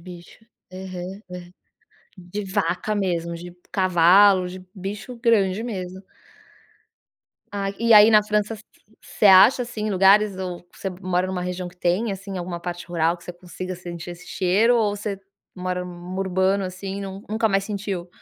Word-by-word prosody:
bicho, 175 -1 -12 0.3
aham, 185 +1 -7
hã 180 0 -9 0.7
de 185 +3 -6
vaca 190 +1 -1
mesmo, 170 -4 -1
de 175 +1 -9 0.2
cavalo, 185 +1 +5
de 185 0 -9
bicho 205 +5 -7
grande, 215 -3 +2
mesmo. 190 -5 -5 1.5
Ah 200 -1 -2
e 230 0 +3
aí 210 +1 +9
na 210 -1 +6
França, 210 +1 -1 0.4
você 210 - 0
acha, 200 +7 +7
assim, 215 -3 -4
lugares 195 +1 +4
ou 180 -2 -6
você 195 - -4
mora 180 0 0
em - - -4
uma 180 -1 -3
região 180 0 -4
que 180 - -17
tem, 180 +6 0
assim, 195 -1 -6
alguma 175 -1 -5
parte 175 0 -6
rural 170 0 0
que 170 - -18
você 175 - -7
consiga 185 +1 -7
sentir 175 -1 -8
esse 175 +1 -11
cheiro 205 +6 +2
ou 205 -2 +1
você 200 -1 -4 0.4
mora 180 -1 -3
num 180 +1 -8
urbano 190 +1 +1
assim 190 +1 -6
e - - -5
nun 195 0 -7
nunca 220 +1 +1
mais 195 0 +1
sentiu? 200 -4 -4
190 Hz, 165 wpm, -23 LUFS, 180-205 Hz, 1.5 s, aí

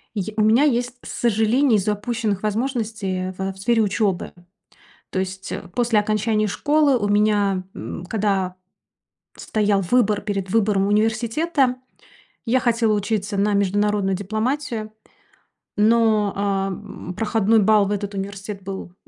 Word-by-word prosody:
И 205 - 0
я 215 +3 -5
у - - +3
меня 220 +6 +4
есть 245 -3 +1
сожаление 230 +2 +2
из-за 210 +1 0
упущенных 210 -1 -2
возможностей, 215 -5 -2
а, - - -7
в 190 +1 -4
в 190 - -16
сфере 225 +2 +2
учебы. 200 -2 -1 0.8
То 185 - -1
есть, 190 0 -5
а, 185 - -6
после 230 +2 +1
окончания 215 0 0
школы, 290 +2 +2
у 205 - -1
меня, 205 -2 +2
м, 175 - -7
когда 195 -3 -1 0.8
стоял 205 -2 0
выбор 210 +1 +2
перед 195 -3 -3
выбором 205 -2 +2
университета, 235 +6 +1 0.7
я 250 +2 +2
хотела 230 -3 +2
учиться 205 -1 -1
на 205 +1 +2
международную 200 0 +1
дипломатию, 220 +3 -3 0.8
но, 215 -1 +3
а, 195 -1 0
м, 185 -1 -7
проходной 220 +1 +2
балл 210 0 +4
в - - -3
этот 205 0 -3
университет 195 +1 -6
был 190 -2 -7
210 Hz, 140 wpm, -22 LUFS, 195-225 Hz, 0.8 s, меня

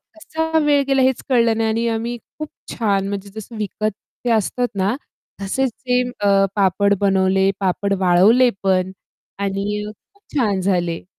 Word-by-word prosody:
कसा 320 0 -2
वेळ 290 -2 +3
गेला 270 -1 +3
हेच 260 -1 +1
कळलं 230 -3 +3
नाही 225 0 +1
आणि 230 +1 0
आम्ही 230 +2 -2 0.2
खूप 305 - -5 0.2
छान 200 -4 0
म्हणजे 200 0 -5
जसं 220 +2 -8
विकत 215 +1 -2 0.3
ते 240 - +1
असतात 230 +3 +1
ना 195 +5 +1 0.5
तसेच 260 +7 0
सेम 250 0 -1
ते 205 -4 -2
अ, 195 0 +4
पापड 200 +1 +3
बनवले, 190 0 +3
पापड 200 +1 0
वाळवले 195 +8 +5
पण 185 -1 +1 0.5
आणि 200 +1 -2 0.3
खूप 405 0 -30
छान 205 -7 +1
झाले. 175 -3 -1
210 Hz, 155 wpm, -20 LUFS, 195-245 Hz, 0.5 s, वाळवले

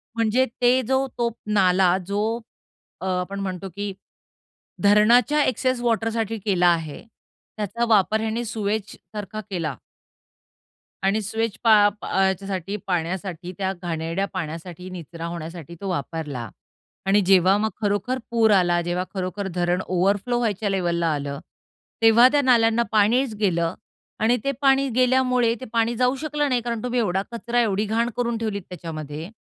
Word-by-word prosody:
म्हणजे 230 +3 +2 0.2
ते 250 +2 +4
जो 265 0 +2
तो 235 -1 +1 0.2
नाला 185 -2 +4
जो 205 +1 0 0.8
अ, - - -4
आपण 185 +2 -2
म्हणतो 190 -1 -4
की 205 -1 -3 0.9
धरणाच्या 235 +8 +5
एक्सेस 255 0 0
वॉटरसाठी 225 -1 0
केला 185 -3 +2
आहे. 165 -4 0 0.5
त्याचा 225 +3 -1
वापर 215 0 +3
ह्याने 225 +2 -2
सीवेजसारखा 215 -1 -4
केला. 165 -7 -3 1.3
आणि 205 +3 +2
सीवेज 225 +2 -1
पा 225 -2 +6 0.3
प - - -6
ह्याच्यासाठी 190 0 0
पाण्यासाठी, 180 0 -3
त्या 190 -1 -1
घाणेरड्या 165 +2 -2
पाण्यासाठी, 175 +1 -6
निचरा 170 -2 -8
होण्यासाठी, 170 -1 -7
तो 195 - -3
वापरला. 145 - -4 0.6
आणि 200 +2 +4
जेव्हा 190 +1 +5
मग 220 +1 0
खरोखर 210 +5 0
पूर 225 -2 +4
आला, 175 -3 +3
जेव्हा 175 +1 -1
खरोखर 190 +1 -3
धरण 175 +1 +1
ओव्हरफ्लो 200 +6 +1
व्हायच्या 215 -3 -1
लेव्हलला 175 -3 0
आलं, 140 -1 -4 0.6
तेव्हा 225 +2 +7
त्या 290 - +3
नाल्यांना 235 -3 +4
पाणीच 225 +4 +3
गेलं 170 -5 0 0.5
आणि 240 +2 +4
ते 275 - +1
पाणी 270 0 +4
गेल्यामुळे, 250 -2 +3
ते - - -5
पाणी 230 +1 +1
जाऊ 250 +2 +2
शकलं 295 -1 0
नाही 245 -2 +1
कारण 235 -2 -3
तुम्ही 250 0 0
एवढा 190 -4 +1
कचरा 235 +1 0
एवढी 210 -1 0
घाण 230 +3 0
करून 235 -1 0
ठेवलीत 215 -3 -3
त्याच्यामध्ये 155 -1 -7
205 Hz, 140 wpm, -23 LUFS, 180-230 Hz, 1.3 s, तेव्हा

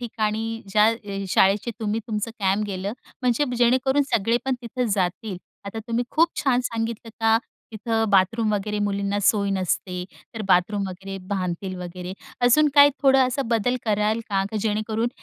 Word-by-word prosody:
ठिकाणी 225 -1 -2
ज्या 210 +2 +4
अ, 200 -3 -3
शाळेचे 200 +6 +3
तुम्ही 215 +1 -1
तुमचं 215 0 -2
कॅम्प 200 +1 +1
गेलं 195 +1 -3 0.3
म्हणजे 250 +3 +2
जेणेकरून 260 +4 +3
सगळे 230 +2 +2
पण 265 -1 +1
तिथं 250 +2 -2
जातील. 185 +2 -2 0.3
आता 200 +3 -6
तुम्ही 235 +1 0
खूप 330 +2 +4
छान 255 -3 +2
सांगितलं 230 -1 -3
का, 225 0 +4 0.4
तिथं 225 +1 -1
बाथरूम 215 +3 +3
वगैरे 210 +1 -1
मुलींना 200 0 -1
सोय 200 0 +3
नसते, 185 -1 -2 0.3
तर 220 - -4
बाथरूम 195 +3 +2
वगैरे 195 +1 -7
बांधतील 185 -1 -3
वगैरे, 180 +1 -6 0.3
अजून 295 +5 +5
काही 285 0 +8
थोडं 270 -1 +5
असा 265 +2 -1
बदल 245 +3 +1
कराल 215 +1 +1
का? 195 -2 +1
का 220 - -3
जेणेकरून, 220 +2 -1
215 Hz, 160 wpm, -24 LUFS, 195-230 Hz, 0.4 s, काही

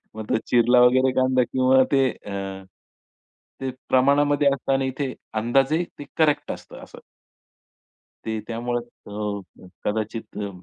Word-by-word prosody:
मग 110 -1 -7
तो - - +3
चिरला 120 +1 +4
वगैरे 130 +1 +5
कांदा 130 -1 +3
किंवा 130 +1 +3
ते 135 -2 +4
अ, 95 -1 -7 1.0
ते 135 - -2
अ, - - -4 0.2
प्रमाणामध्ये 145 +2 +3
असतं 135 0 -1
आणि 135 0 +1
इथे 130 0 -3 0.2
अंदाजे 135 +9 +2 0.2
ते 145 - -7
करेक्ट 155 -2 +2
असतं - - -10
असं. - - -13 1.3
ते 110 -1 -2
त्यामुळे 120 +1 -2 0.3
अ, 100 -3 -6 0.2
कदाचित 110 +1 -3
अ, 100 -1 -3
125 Hz, 135 wpm, -23 LUFS, 110-135 Hz, 1.3 s, वगैरे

